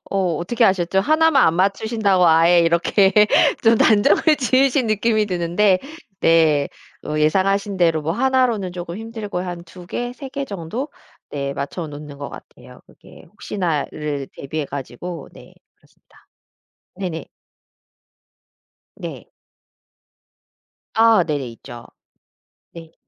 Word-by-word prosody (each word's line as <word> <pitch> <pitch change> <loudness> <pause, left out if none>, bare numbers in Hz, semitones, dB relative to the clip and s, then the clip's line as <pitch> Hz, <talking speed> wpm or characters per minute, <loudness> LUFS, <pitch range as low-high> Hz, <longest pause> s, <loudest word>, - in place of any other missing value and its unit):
어 185 -4 0
어떻게 230 +9 0
아셨죠? 190 -1 +2
1 315 +8 +3
만 270 -9 +5
안 160 - +2
맞추신다고 195 0 +1
아예 165 +2 +5
이렇게 170 +4 +3 0.5
좀 230 0 +5
단정을 215 -2 +4 0.2
지으신 260 0 +2
느낌이 215 0 +1
드는데 185 +1 +1 0.4
네 155 -3 +3 0.4
어 150 0 -3
예상하신 195 +5 +1
대로 165 -3 +2
뭐 155 - -2
1 260 +4 +2
로는 200 -7 -3
쪼금 175 -1 -7
힘들고 220 -3 -6
한 175 -1 -6
2 175 +1 -13
개 245 +6 -4
3 265 +2 -9
개 275 +1 -4
정도? 205 - -5 0.4
네 140 -1 -3
맞춰 145 +4 -5
놓는 145 -1 -10
것 140 - -6
같아요. - - -14
그게 - - -17
혹시나를 150 -5 -4
대비해 150 +2 -5
가지고 140 +4 -7
네 - - -16 0.2
그렇습니다. - - -27 0.7
네네. 180 -4 -5 1.7
네. - - -9 1.6
아 225 -4 +5
네네 145 -5 -3
있죠. 120 0 -12 0.9
네. 165 -1 -12
180 Hz, 230 characters per minute, -20 LUFS, 160-220 Hz, 1.7 s, 만